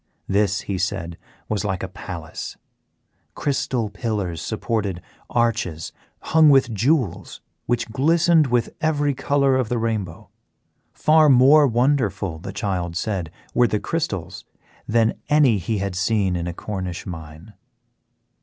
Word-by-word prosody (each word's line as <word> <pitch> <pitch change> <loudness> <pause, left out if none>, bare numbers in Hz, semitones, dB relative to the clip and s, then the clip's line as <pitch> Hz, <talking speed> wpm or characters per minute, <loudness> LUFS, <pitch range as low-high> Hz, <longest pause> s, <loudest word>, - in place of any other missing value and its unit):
This, 100 0 +1
he 95 -2 -4
said, 95 -3 -2 0.3
was 105 -1 -1
like 95 -3 -2
a - - -2
palace. 90 -4 -7 0.8
Crystal 130 -5 -1
pillars 100 -7 -3
supported 105 -3 -2 0.3
arches 100 -9 -1 0.3
hung 160 -1 +5
with 135 -4 +4
jewels 120 - 0 0.3
which 120 0 0
glistened 160 +4 +3
with 120 -1 0
every 145 -3 +1
colour 140 0 +2
of 130 -4 0
the 120 - 0
rainbow. 110 -7 -3 0.6
Far 155 0 +4
more 140 +3 +6
wonderful, 115 - 0
the - - -7
child 90 -4 -3
said, 95 -5 -2 0.2
were 120 - +4
the 105 - -1
crystals 145 - -3 0.4
than 115 0 +2
any 140 -8 +4
he 110 +5 -2
had 100 -1 -2
seen 95 0 +1
in 85 0 -3
a 85 - -3
Cornish 95 -4 -5
mine. 80 +2 -9
110 Hz, 130 wpm, -22 LUFS, 95-130 Hz, 0.8 s, more